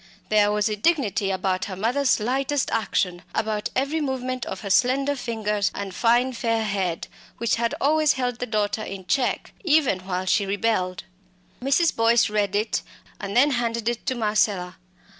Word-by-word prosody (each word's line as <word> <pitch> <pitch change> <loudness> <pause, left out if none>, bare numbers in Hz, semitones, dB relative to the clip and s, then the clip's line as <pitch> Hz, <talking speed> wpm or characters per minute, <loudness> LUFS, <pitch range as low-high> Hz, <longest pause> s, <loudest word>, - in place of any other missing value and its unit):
There 210 -1 +4
was 210 +1 +1
a 215 - -1
dignity 210 - +1
about 185 -1 -1
her 190 - -6
mother's 245 +8 +1
lightest 265 +5 0
action, 185 -5 0
about 215 -1 -1
every 285 +4 0
movement 255 -3 -3
of 190 - -5
her 200 - -5
slender 270 +6 +3
fingers 215 -5 -1
and 200 -2 -5
fine 240 +5 +2
fair 230 -1 0
head, 195 -5 -2 0.3
which 235 -1 0
had 235 0 0
always 305 +1 +3
held 250 -2 -2
the 250 - -3
daughter 215 -1 -1
in 195 -3 -7
check, 255 +5 0
even 300 - +3
while 185 0 -3
she 200 +1 +2
rebelled. 195 -3 -1 0.6
Mrs. 275 +6 +2
Boyce 230 -1 +3
read 205 -2 0
it, 215 +1 0 0.4
and 200 +2 -3
then 285 +4 +5
handed 235 -2 -1
it 240 -1 -2
to 260 - 0
Marcella. 210 -5 0
225 Hz, 165 wpm, -24 LUFS, 200-255 Hz, 0.6 s, then